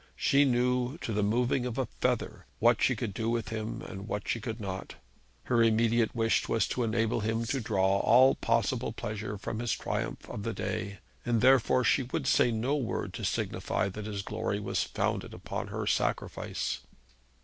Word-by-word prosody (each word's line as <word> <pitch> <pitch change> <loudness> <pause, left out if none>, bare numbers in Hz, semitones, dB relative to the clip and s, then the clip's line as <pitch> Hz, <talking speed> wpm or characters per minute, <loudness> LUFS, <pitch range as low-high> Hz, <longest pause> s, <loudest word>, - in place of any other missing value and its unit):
She 140 +1 +4
knew, 125 +2 +1
to 115 - -3
the 105 - +1
moving 120 +4 +1
of 120 0 -5
a 130 - +1
feather, - - -2
what - - +4
she - - +3
could 100 - -3
do 115 +3 -2
with 115 -1 -1
him 110 -1 -4
and 95 +2 -8
what 105 -2 -3
she 115 - -1
could 115 0 -4
not. 95 -2 -5 0.5
Her 120 -2 +2
immediate 115 +1 +3
wish 115 -1 +1
was 115 - +2
to 125 - -1
enable 115 0 +1
him 110 +2 -1
to 130 +3 -1
draw 100 -2 +2
all 130 +5 +6
possible - - 0
pleasure 105 0 -4
from 110 +2 -4
his 120 -2 0
triumph - - -3
of - - -6
the - - -3
day, 100 +1 -3 0.3
and 120 -2 +1
therefore 130 0 +4
she 135 - +3
would 125 0 -3
say 125 - +4
no 120 +5 0
word 130 -6 -2
to - - -6
signify - - -1
that 105 +2 -6
his 100 -2 -4
glory 105 -1 -2
was 105 - -1
founded - - -2
on - - -2
her - - -4
sacrifice. - - -1
115 Hz, 185 wpm, -30 LUFS, 105-120 Hz, 0.5 s, all